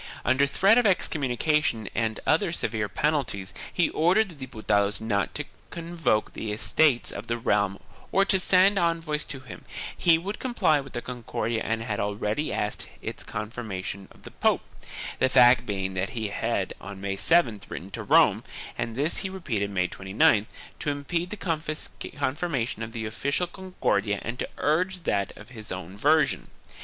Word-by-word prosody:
Under 130 +2 +4
threat 195 +11 +5
of 245 - +2
excom 180 -6 +2
munication 130 -3 +1
and 110 -1 -1
other 165 +3 +3
severe 110 -9 -1
penalties 135 - -1 0.2
he 175 - +2
ordered 190 +7 +3
the 170 - -11
Diputados 105 -4 +1
not 100 -5 -1
to - - -1 0.3
convoke 165 -10 -1
the 110 - -4
Estates 125 +4 +2
of - - -7
the 120 - -1
realm 105 -3 +1 0.3
or 195 +1 +4
to 195 -1 +3
send 190 +2 +5
envoys 165 -3 0
to 135 - -6
him; 130 -4 -10 0.3
he 165 -2 +5
would 195 +5 -5
comply 200 - +2
with 135 - -12
the 120 - -4
Concordia 120 -2 -3
and 115 0 -1
had 110 -3 -2
already 105 +7 -1
asked - - -2 0.2
its - - -5
confirmation 100 -3 -5
of - - -19
the - - -10
pope - - +2 0.3
— - - -5
the 130 - +3
fact 125 -1 +6
being 95 -2 -2
that 95 +1 -1
he 110 -2 -1
had - - -1
on 100 0 -8
May 100 0 -2
7th 115 - +2
written 95 +3 -7
to - - -5
Rome - - +4 0.2
— - - -10
and 115 -1 -2
this 145 +6 +1
he 190 - -2
repeated 120 - -2
May 90 -2 +1
29th 100 +3 +2 0.2
— - - -21
to - - -1
impede 165 +5 -2
the 165 -6 -4
confirmation 140 -5 -1
of 115 0 -5
the 115 -2 -3
official 140 +10 -1
Concordia 170 - -1
and 120 +2 -4
to - - -2
urge 180 +4 +1
that 100 -9 0
of 105 - -12
his 110 -4 -10
own 95 0 -6
version. 150 +8 +2
125 Hz, 175 wpm, -27 LUFS, 105-165 Hz, 0.3 s, fact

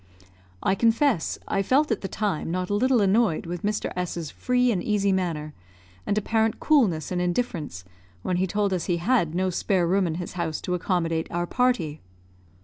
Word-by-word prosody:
I 190 - +3
confess 230 - +2
I 195 - +1
felt 270 +7 +2
at 225 - 0
the 195 - -3
time 195 -7 -2
not 180 +2 -2
a - - +1
little 250 +2 +3
annoyed 200 -4 +2
with 175 0 -5
Mr. 210 +1 -2
S 180 -1 -3
's 165 -3 -5
free 250 -1 +1
and 185 -5 0
easy 200 -1 +1
manner, 165 -5 -2 0.5
and 205 - +1
apparent 220 +1 +1
coolness 210 - +2
and 180 -1 0
indifference 175 - -2 0.4
when 180 - 0
he 190 +1 +1
told 205 +1 0
us 180 -3 -1
he 175 - 0
had 170 -4 +1
no 185 +1 +1
spare 180 0 +1
room 185 +2 +2
in 160 - -2
his 175 0 -5
house 170 -4 -2
to 180 - -3
accommodate 165 -2 0
our 175 0 -1
party. 180 -10 0
185 Hz, 190 wpm, -25 LUFS, 170-220 Hz, 0.5 s, I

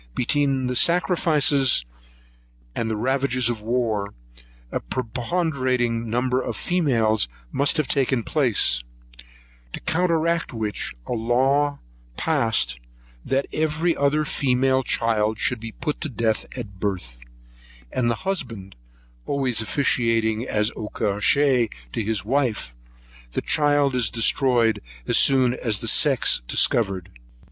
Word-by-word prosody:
Between 135 0 +1
the 125 0 -2
sacrifices 150 - +3 0.9
and 115 - -2
the 110 - -2
ravages 130 0 +1
of 110 -3 -6
war, 110 -3 -1 0.6
a - - -1
preponderating 125 - -2
number 125 +2 0
of - - -4
females 115 - +1 0.2
must 140 +2 +2
have 155 -3 0
taken 130 -4 +1
place; 120 - +2 0.9
to - - -5
counteract 170 -2 0
which, 110 - -4
a - - -7
law 135 +5 +1 0.4
passed, 110 - 0 0.4
that 135 +1 0
every 160 +2 0
other 145 +2 +1
female 130 -1 +1
child 110 -3 0
should 125 +2 0
be 115 0 -7
put 150 -2 -4
to 155 - -3
death 115 -3 -1
at 100 -2 -8
birth; 90 - -4 0.7
and 120 -2 0
the 115 - -3
husband 115 - -4 0.5
always 130 -5 0
officiating 115 -2 0
as 105 +1 0
acoucheur 115 +4 +1 0.2
to 115 - -2
his 105 -2 -2
wife, 120 - -1 0.6
the - - -1
child 145 -2 +2
is 125 -5 +1
destroyed 115 -1 +2 0.2
as - - +3
soon 130 -3 +4
as 115 -4 0
the - - -4
sex - - +4
is - - -13
discovered. 95 - +1
125 Hz, 120 wpm, -23 LUFS, 110-140 Hz, 0.9 s, soon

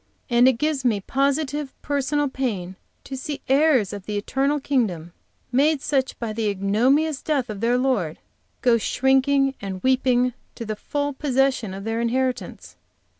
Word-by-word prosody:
And 240 +1 +6
it 260 - +6
gives 285 +2 -1
me 225 -5 +2
positive 280 +4 -1
personal 285 +1 0
pain 210 -10 -3 0.3
to 270 - -7
see 280 +2 -5
heirs 270 -7 +3
of 200 -2 -8
the 210 -1 -2
eternal 275 +7 0
kingdom, 200 - -1 0.4
made 290 +4 +3
such 270 -1 -1
by 230 -2 -4
the 215 -1 -1
ignominious 250 +10 +1
death 270 -7 -1
of 205 -1 -7
their 240 +2 +2
Lord, 240 -12 0 0.4
go 240 -2 +4
shrinking 270 +3 +2
and 190 -2 -6
weeping 255 -1 +2 0.2
to 230 - -6
the 215 0 -3
full 285 +6 -3
possession 265 -6 0
of 195 - -7
their 225 +2 -2
inheritance." 235 - -2
255 Hz, 155 wpm, -23 LUFS, 215-275 Hz, 0.4 s, And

